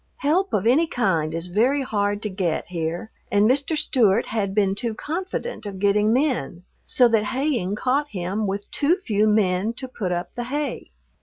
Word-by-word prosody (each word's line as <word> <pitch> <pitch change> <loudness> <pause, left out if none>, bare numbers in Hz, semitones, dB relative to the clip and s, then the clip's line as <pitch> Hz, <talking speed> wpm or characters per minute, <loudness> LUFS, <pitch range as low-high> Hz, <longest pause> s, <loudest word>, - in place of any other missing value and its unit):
Help 360 +7 +1
of 205 0 0
any 285 +8 +4
kind 170 - 0
is 165 +1 -3
very 240 +10 +1
hard 205 -3 -1
to - - -1
get 185 -4 -2
here, 170 +5 -3 0.2
and 205 +1 +4
Mr. 280 +5 +1
Stewart 235 -8 +3
had 200 -3 -1
been 200 -2 +3
too 225 +2 -3
confident 365 - -4
of 195 -1 -6
getting 205 +2 +2
men, 245 - 0 0.2
so 250 - +4
that 220 -2 +2
haying 255 -6 -1
caught 275 +6 0
him 195 +1 -2
with 200 +1 -4
too 300 +5 +2
few 215 - +1
men 210 0 +2
to 260 +2 -7
put 205 -7 -4
up 175 0 -3
the 240 -1 -4
hay. 290 +4 -3
215 Hz, 180 wpm, -23 LUFS, 195-265 Hz, 0.2 s, any